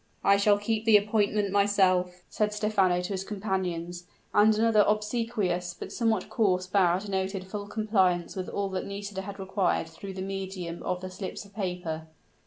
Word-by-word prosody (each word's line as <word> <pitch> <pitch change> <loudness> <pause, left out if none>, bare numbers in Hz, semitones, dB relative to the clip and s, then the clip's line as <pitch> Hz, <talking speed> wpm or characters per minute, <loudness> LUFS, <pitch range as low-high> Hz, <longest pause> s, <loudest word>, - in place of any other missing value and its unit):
"I 200 0 +5
shall 205 0 +4
keep 220 +1 -2
the 220 -2 +8
appointment 210 -1 +1
myself," 185 -3 +2
said 210 -1 0
Stephano 200 -4 +2
to 180 +3 -4
his 190 0 -3
companions; 185 -4 -3 0.3
and 210 +1 +5
another 220 -1 +4
obsequious 210 -5 -1
but - - -8
somewhat 225 -5 0
coarse 185 -5 +1
bow 185 -2 +3
denoted 190 -1 -3
full 205 +1 -6
compliance 195 -5 +1
with 185 -1 -4
all 200 -1 -2
that 190 -1 -3
Nisida 200 -1 -5
had 200 +1 -7
required 190 -2 0
through 190 +4 -9
the 185 - -4
medium 190 -3 -5
of 180 0 -2
the 185 0 -6
slips 190 +2 -6
of 200 - -18
paper. 180 -5 -4
195 Hz, 170 wpm, -28 LUFS, 185-210 Hz, 0.3 s, the